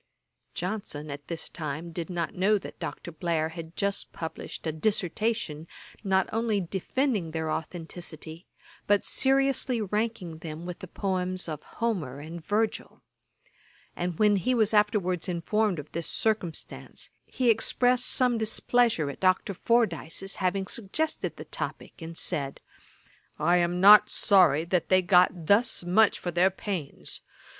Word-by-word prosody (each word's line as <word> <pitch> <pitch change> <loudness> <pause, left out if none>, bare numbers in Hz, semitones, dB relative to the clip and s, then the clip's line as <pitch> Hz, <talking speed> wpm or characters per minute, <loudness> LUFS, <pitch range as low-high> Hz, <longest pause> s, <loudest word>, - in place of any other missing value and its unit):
Johnson, 175 -6 -4
at 145 +1 -8
this 170 -2 -4
time, 155 +1 -5
did 165 +1 -5
not 170 -2 -2
know 200 +4 +3
that 195 - -10
Dr. 175 - -6
Blair 160 -1 -1
had 165 0 -9
just 200 0 -1
published 160 0 -7
a 160 - 0
Dissertation, 180 -1 -1 0.4
not 190 -2 +2
only 225 -2 +1
defending 195 - -1
their 160 -1 -3
authenticity, 165 0 -7 0.4
but 205 0 +3
seriously 270 -2 +2
ranking 210 -5 -2
them 160 +1 -7
with 180 -1 -6
the 185 - -8
poems 185 -1 -1
of 155 -2 -5
Homer 175 - -3
and 160 +3 -8
Virgil; 215 +5 -2 0.9
and 175 -2 -3
when 210 -1 +4
he 250 +7 +1
was 220 -2 +3
afterwards 200 -4 +1
informed 190 +3 0
of 150 0 -8
this 170 0 -4
circumstance, 215 -7 -3 0.2
he 250 -3 +2
expressed 245 +3 +2
some 250 -3 +2
displeasure 220 -5 +2
at - - -12
Dr. 185 +1 +2
Fordyce's 195 -4 0
having 190 +1 0
suggested 235 +11 -2
the - - -8
topick, - - -6
and 165 0 -7
said, 140 -2 -1 0.8
'I 175 +4 +3
am 175 0 +1
not 210 +2 +8
sorry 170 -7 +4
that 175 0 0
they 185 0 +4
got 180 -2 +4
thus 205 +2 +3
much 195 +4 +4
for 175 - -4
their 175 +3 +4
pains. 190 -6 -6
185 Hz, 140 wpm, -27 LUFS, 165-215 Hz, 0.9 s, not